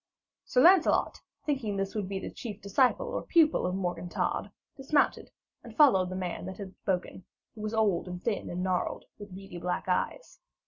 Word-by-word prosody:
Sir 250 - +2
Lancelot, 360 0 +4 0.2
thinking 250 -9 -1
this 195 0 -2
would 205 -3 -3
be 195 - -2
the 190 - -5
chief 215 -4 -7
disciple 255 - +2
or - - -2
pupil 320 - +3
of 180 - -2
Morgan 175 -2 -3
Todd, - - -1 0.3
dismounted, 285 +2 +1 0.3
and - - -12
followed 195 - +5
the 185 - -5
man 180 -1 -4
that 190 - -7
had 195 -2 -8
spoken, 185 -1 -3 0.3
who 215 - -10
was 215 +1 -3
old 205 -6 +1
and 180 0 -5
thin 225 -3 -2
and 180 +1 -3
gnarled, 185 -1 -1
with 205 -3 -9
beady 190 -2 -9
black 180 +2 -3
eyes. 185 - -2
195 Hz, 185 wpm, -29 LUFS, 180-240 Hz, 0.3 s, followed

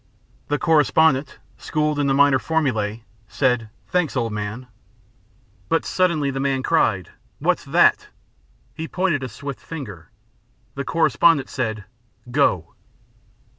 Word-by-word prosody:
The 145 - 0
correspondent, 150 -3 +3 0.2
schooled 150 -1 -1
in 145 - +1
the 135 - +2
minor 140 -1 +5
formulae, 115 -10 -1 0.2
said: 120 +1 0 0.2
"Thanks, 180 -6 0
old 115 -3 -1
man." 105 +4 -5 1.0
But 165 - +1
suddenly 165 -6 +1
the 135 - -4
man 135 -1 0
cried: 95 - +1 0.3
"What's - - 0
that?" - - +3 0.7
He 160 - -6
pointed 180 -6 0
a 130 - -4
swift 140 0 -7
finger. 100 - -9 0.6
The 140 0 -5
correspondent 160 -1 +3
said: 110 -5 -3 0.5
"Go." 95 - +1
140 Hz, 120 wpm, -22 LUFS, 115-155 Hz, 1.0 s, minor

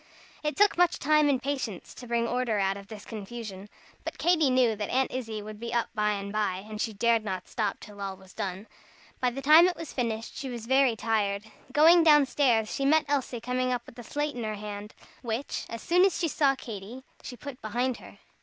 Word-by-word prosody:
It 300 0 -2
took 410 -3 +4
much 355 -2 +4
time 305 0 +3
and 270 -3 +2
patience 260 -9 -4
to 245 - -11
bring 235 0 0
order 245 -3 0
out 195 -1 +1
of 200 0 -10
this 215 -1 -10
confusion. 210 -2 -7 0.3
But - - -5
Katy 325 -5 +3
knew 250 -3 +3
that 210 0 -4
Aunt 260 +1 +1
Izzie 225 -4 -4
would 215 0 -9
be 235 0 -5
up 235 - +1
by 210 0 +1
and 200 0 -5
by, 200 -2 -1
and 215 0 -5
she 225 - -1
dared 230 +1 +2
not 190 -3 -4
stop 215 -4 -2
till 205 -1 -11
all 195 -1 -4
was 190 -1 -17
done. 190 +1 -4 0.5
By 250 - +2
the 270 +3 -6
time 315 +5 +8
it 365 - -1
was 330 -2 -8
finished, 225 -3 -3
she 270 - -5
was 235 -2 -6
very 265 -1 +4
tired. 210 -3 0 0.3
Going 325 +5 +7
down 295 -3 +7
stairs, 240 -6 +2
she 275 - -2
met 305 +2 +4
Elsie 270 -4 -1
coming 250 +2 -1
up 245 -1 -2
with 240 - -13
a - - -7
slate 295 +5 -2
in 240 - -5
her 215 -1 -2
hand, 210 0 -7 0.3
which, 235 +3 -3
as 230 0 -6
soon 355 +2 +4
as 385 -2 +3
she 340 - 0
saw 280 -3 +2
Katy, 230 +1 -8 0.2
she 245 - -8
put 270 +2 -9
behind 245 +3 -1
her. - - -14
235 Hz, 225 wpm, -28 LUFS, 210-275 Hz, 0.5 s, time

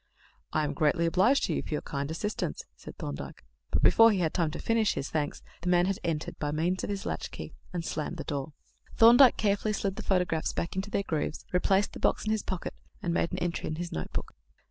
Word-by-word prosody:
"I 155 - +1
am 145 -1 -1
greatly 155 +3 +2
obliged 190 +11 +3
to - - 0
you - - 0
for 155 - -3
your - - -4
kind 140 0 -3
assistance," 210 +7 -3
said - - -11
Thorndyke; - - -6 0.2
but - - 0
before 225 0 +7
he 205 - +1
had 165 -4 0
time 170 -4 +1
to 155 - -6
finish 225 -2 +1
his 135 - -4
thanks, 150 -2 -2 0.2
the 180 - -1
man 175 0 +4
had 195 0 -1
entered, 160 -3 -3
by 145 - -1
means 165 +5 0
of - - -3
his 200 -1 -3
latchkey, - - -5 0.2
and 175 -2 -3
slammed 155 +3 -3
the 155 - -4
door. 145 +1 -4 0.4
Thorndyke 240 +3 +8
carefully 210 0 +1
slid 195 -1 -2
the - - -4
photographs 180 -4 0
back 170 - -3
into 190 +2 -2
their 200 - 0
grooves, 155 -3 -3
replaced 190 +2 +2
the - - -7
box - - +1
in 215 - 0
his 220 -1 +1
pocket, 185 -2 -4 0.3
and 170 - 0
made 170 - +1
an 180 - -3
entry 175 -2 -2
in 155 - -2
his 175 +2 -5
notebook. 80 - -4
175 Hz, 230 wpm, -29 LUFS, 155-200 Hz, 0.4 s, Thorndyke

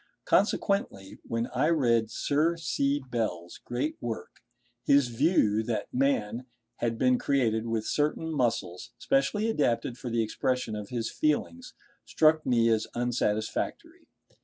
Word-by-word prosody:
Consequently, 150 - 0
when 115 0 -1
I 130 +4 +2
read 120 -9 +2
Sir 155 +8 0
C. 140 -3 0
Bell's 90 -7 -3
great 130 +6 -3
work, 115 -7 -6 0.4
his 140 -3 +4
view, 115 - +2
that 110 0 -4
man 125 -3 0 0.3
had 115 -1 -1
been 125 0 +3
created 115 -5 +1
with 115 -1 -1
certain 155 +2 -1
muscles 115 - -2
specially 225 -6 +1
adapted 120 - 0
for 125 - -5
the 115 -1 +1
expression 125 +1 -2
of 105 -1 -6
his 115 -2 -3
feelings, 250 +12 -1 0.3
struck 155 0 +3
me 115 -2 +3
as 110 -1 +1
unsatisfactory. 115 -3 -2
120 Hz, 130 wpm, -28 LUFS, 110-145 Hz, 0.4 s, his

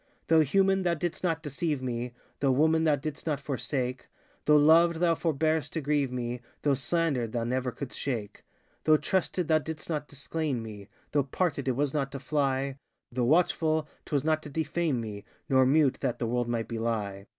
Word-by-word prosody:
Though 160 0 +6
human, 190 +6 +3
thou 175 -2 +1
didst 175 +2 -3
not 165 -2 0
deceive 150 0 -2
me, 125 -1 -3 0.3
Though 135 -2 +3
woman, 160 +4 +3
thou 155 -2 +4
didst 145 +3 -6
not 150 -3 0
forsake, 130 -2 -3 0.4
Though 150 0 +6
loved, 165 +3 +6
thou 170 0 +3
forborest 160 -1 0
to 160 - -1
grieve 145 -2 +1
me, 125 -1 -3 0.2
Though 145 - +3
slandered, 135 -3 0
thou 120 -1 0
never 125 +1 -1
couldst 125 +3 -6
shake, 110 -7 -3
ŌĆö - - -37
Though 155 -1 +6
trusted, 180 +2 0
thou 155 -1 +4
didst 155 +1 -7
not 150 -2 -2
disclaim 145 -3 -3
me, 105 -3 -9 0.2
Though 145 - +3
parted, 140 0 -1
it 130 - +1
was 145 +1 0
not 140 -3 -1
to 140 - -4
fly, 135 -1 0 0.3
Though 125 0 0
watchful, 160 +1 +2 0.2
ŌĆÖtwas 140 -3 0
not 155 0 +1
to 150 - -9
defame 155 -2 -1
me, 105 -3 -6 0.2
Nor 130 -1 +4
mute, 145 -1 +3
that 120 - -1
the 120 - -2
world 120 +1 0
might 115 -2 -1
belie. 110 -4 -3
145 Hz, 190 wpm, -29 LUFS, 125-160 Hz, 0.4 s, Though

